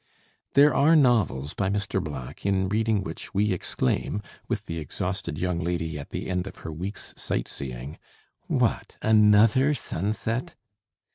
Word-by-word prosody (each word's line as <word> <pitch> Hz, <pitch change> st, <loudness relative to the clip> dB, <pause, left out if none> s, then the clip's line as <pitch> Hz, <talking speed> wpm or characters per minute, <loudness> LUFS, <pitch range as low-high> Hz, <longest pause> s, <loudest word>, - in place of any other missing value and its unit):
There 145 Hz, +1 st, +7 dB
are 155 Hz, +4 st, +5 dB
novels 110 Hz, -, +3 dB
by 100 Hz, -1 st, 0 dB
Mr. 100 Hz, -2 st, -1 dB
Black 70 Hz, -6 st, -7 dB
in 95 Hz, -1 st, +1 dB
reading 110 Hz, -1 st, +1 dB
which 85 Hz, +3 st, -7 dB
we 105 Hz, +1 st, +2 dB
exclaim, 95 Hz, +4 st, -1 dB, 0.2 s
with -, -, -2 dB
the 85 Hz, 0 st, -4 dB
exhausted 90 Hz, +2 st, -3 dB
young 90 Hz, 0 st, -1 dB
lady 80 Hz, -2 st, -2 dB
at 70 Hz, -, -8 dB
the -, -, -4 dB
end 90 Hz, +1 st, -1 dB
of -, -, -8 dB
her 80 Hz, -, -3 dB
week's 90 Hz, +6 st, -4 dB
sight -, -, -2 dB
seeing, 65 Hz, +2 st, -6 dB, 0.5 s
"What! -, -, 0 dB
another 110 Hz, +6 st, +5 dB
sunset!" 115 Hz, -, -2 dB
95 Hz, 145 wpm, -26 LUFS, 80-110 Hz, 0.5 s, There